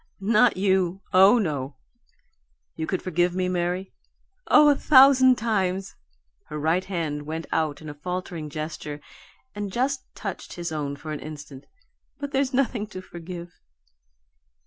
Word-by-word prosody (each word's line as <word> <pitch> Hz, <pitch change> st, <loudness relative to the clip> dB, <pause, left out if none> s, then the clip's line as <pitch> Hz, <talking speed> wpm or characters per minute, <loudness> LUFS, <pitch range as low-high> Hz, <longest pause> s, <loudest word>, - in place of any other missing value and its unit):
"Not 215 Hz, +3 st, +3 dB
you 190 Hz, -1 st, +1 dB
oh 195 Hz, +5 st, +7 dB
no!" 145 Hz, -, -2 dB, 1.0 s
"You 160 Hz, 0 st, -4 dB
could 185 Hz, -, -2 dB
forgive 175 Hz, 0 st, +1 dB
me, 185 Hz, 0 st, 0 dB
Mary?" 180 Hz, +1 st, -2 dB, 0.5 s
"Oh, 300 Hz, 0 st, +7 dB
a 290 Hz, -, +5 dB
thousand 260 Hz, -3 st, +6 dB
times!" 195 Hz, -4 st, -1 dB, 0.5 s
Her 150 Hz, -, -6 dB
right 160 Hz, +5 st, +1 dB
hand 155 Hz, -6 st, -3 dB
went 160 Hz, +1 st, -4 dB
out 155 Hz, -1 st, -1 dB
in -, -, -9 dB
a 150 Hz, -, -6 dB
faltering 175 Hz, 0 st, -5 dB
gesture, 155 Hz, -1 st, -6 dB, 0.5 s
and 205 Hz, -1 st, -5 dB
just 260 Hz, +4 st, -1 dB
touched 195 Hz, -4 st, -6 dB
his 175 Hz, -1 st, -5 dB
own 145 Hz, -2 st, -3 dB
for 155 Hz, +2 st, -8 dB
an 150 Hz, -, -4 dB
instant. 150 Hz, -3 st, -10 dB, 0.5 s
"But 285 Hz, -1 st, -5 dB
there's 270 Hz, -1 st, +1 dB
nothing 250 Hz, -5 st, 0 dB
to 190 Hz, -3 st, -8 dB
forgive." 175 Hz, -1 st, -9 dB
180 Hz, 145 wpm, -25 LUFS, 155-210 Hz, 1.0 s, oh